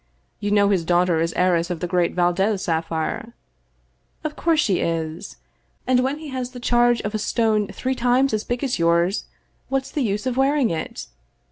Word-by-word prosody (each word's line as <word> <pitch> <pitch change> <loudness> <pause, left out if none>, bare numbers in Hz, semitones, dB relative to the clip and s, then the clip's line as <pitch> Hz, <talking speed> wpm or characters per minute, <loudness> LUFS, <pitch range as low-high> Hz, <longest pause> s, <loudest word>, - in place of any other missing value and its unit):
You 205 0 -2
know 205 -1 +4
his 190 -4 +2
daughter 175 -1 +2
is 165 +1 0
heiress 175 -1 +2
of 175 -2 -3
the 180 - -2
great 175 -1 0
Valdez 185 +3 +1
sapphire 165 +8 -2 0.3
" - - -42
" - - -43
Of 310 -1 -3
course 330 -2 +1
she 200 -11 +2
is, 165 +3 -3 0.5
and 255 -1 +3
when 265 +3 0
he 310 -1 -8
has 255 -2 -4
the 250 - -8
charge 240 0 +3
of 210 - -4
a 215 - -1
stone 215 -1 +1
three 260 +6 -3
times 250 +1 +2
as 215 0 0
big 245 +2 -3
as 255 -8 -1
yours, 170 +3 +2 0.4
what's 270 0 -1
the 300 - -2
use 210 -1 -1
of 255 -1 -1
wearing 270 -2 +2
it? 160 -1 -4
210 Hz, 200 wpm, -22 LUFS, 175-250 Hz, 0.5 s, know